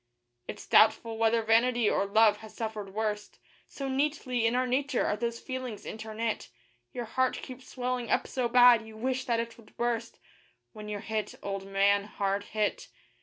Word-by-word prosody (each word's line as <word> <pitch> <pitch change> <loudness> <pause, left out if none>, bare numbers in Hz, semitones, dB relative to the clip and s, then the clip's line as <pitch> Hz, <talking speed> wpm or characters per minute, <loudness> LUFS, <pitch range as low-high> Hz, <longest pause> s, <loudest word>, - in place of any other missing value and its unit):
It's - - -7
doubtful 225 +1 +4
whether 225 0 +3
vanity 230 +1 +3
or 200 - +1
love 215 +1 +5
has 220 0 -13
suffered 215 -3 -5
worst, 210 -1 -3 0.3
So 275 - -6
neatly 265 -3 0
in 230 - 0
our 255 +1 +2
nature 265 +1 0
are - - +1
those 235 +1 -3
feelings 255 -5 -6
interknit, 220 0 -4 0.4
Your 245 - -5
heart 255 +3 0
keeps 255 0 -10
swelling 250 -2 -3
up - - +2
so 250 -2 -2
bad, 245 -1 +7
you 220 0 -12
wish 260 +2 -2
that 235 -2 +1
it 230 0 -5
would 220 - -19
burst, 235 -1 -2 0.6
When 210 -1 -8
you're 205 -1 -4
hit, 220 -1 -3
old 195 -1 -4
man 200 +1 +3
hard 200 -1 -2
hit. 210 -1 -2
225 Hz, 170 wpm, -29 LUFS, 215-250 Hz, 0.6 s, bad